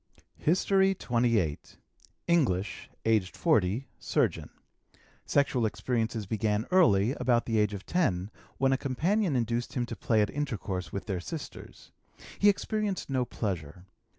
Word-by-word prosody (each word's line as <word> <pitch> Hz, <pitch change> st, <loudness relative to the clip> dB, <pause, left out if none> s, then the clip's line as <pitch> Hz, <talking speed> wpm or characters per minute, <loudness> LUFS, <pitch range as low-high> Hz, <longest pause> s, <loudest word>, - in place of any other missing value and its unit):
HISTORY 190 Hz, +3 st, +3 dB
XXVIII. 115 Hz, -, +1 dB, 0.7 s
English, 120 Hz, -, +1 dB, 0.2 s
aged 110 Hz, -5 st, +1 dB
40, 115 Hz, -, +2 dB
surgeon. -, -, 0 dB, 0.8 s
Sexual 130 Hz, -5 st, +2 dB
experiences 115 Hz, -1 st, -2 dB
began 105 Hz, +1 st, 0 dB
early, 120 Hz, -, +4 dB
about 120 Hz, -2 st, +2 dB
the 115 Hz, -2 st, +1 dB
age 105 Hz, -1 st, +1 dB
of 95 Hz, -1 st, -9 dB
10, 105 Hz, -, 0 dB, 0.3 s
when 135 Hz, 0 st, +3 dB
a 135 Hz, -, 0 dB
companion 165 Hz, -, 0 dB
induced 120 Hz, 0 st, -1 dB
him 125 Hz, -2 st, -1 dB
to -, -, -6 dB
play 110 Hz, -2 st, +2 dB
at 105 Hz, -, -2 dB
intercourse 105 Hz, -10 st, -3 dB
with 100 Hz, -, -5 dB
their 95 Hz, -4 st, -2 dB
sisters. 150 Hz, -, -9 dB, 0.5 s
He 205 Hz, -, +6 dB
experienced 205 Hz, -4 st, -1 dB
no 130 Hz, -2 st, +1 dB
pleasure. 90 Hz, -7 st, -4 dB
120 Hz, 130 wpm, -29 LUFS, 100-145 Hz, 0.8 s, He